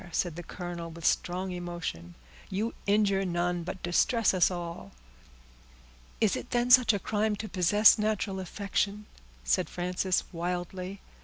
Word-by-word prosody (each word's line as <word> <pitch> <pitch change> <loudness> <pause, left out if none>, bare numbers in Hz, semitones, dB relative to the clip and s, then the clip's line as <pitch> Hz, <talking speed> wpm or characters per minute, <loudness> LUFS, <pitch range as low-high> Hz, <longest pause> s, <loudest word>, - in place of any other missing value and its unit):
said 170 -1 -1
the 175 - -6
colonel, 175 -1 -6
with 165 0 -9
strong 185 +1 0
emotion; 170 - -5 0.3
"you 215 +5 -2
injure 200 -1 +3
none, 175 -1 -1
but 180 +2 -7
distress 210 +6 +2
us 180 -3 +4
all." 170 - -6 1.3
"Is 220 -3 +3
it - - -6
then 245 0 +1
such 245 -2 +8
a 205 - 0
crime 215 +1 0
to 215 +2 -6
possess 205 +4 +5
natural 210 -2 -1
affection?" 200 +2 -2 0.4
said - - +1
Frances 180 +1 -1
wildly. 180 +2 -4
185 Hz, 140 wpm, -29 LUFS, 175-205 Hz, 1.3 s, such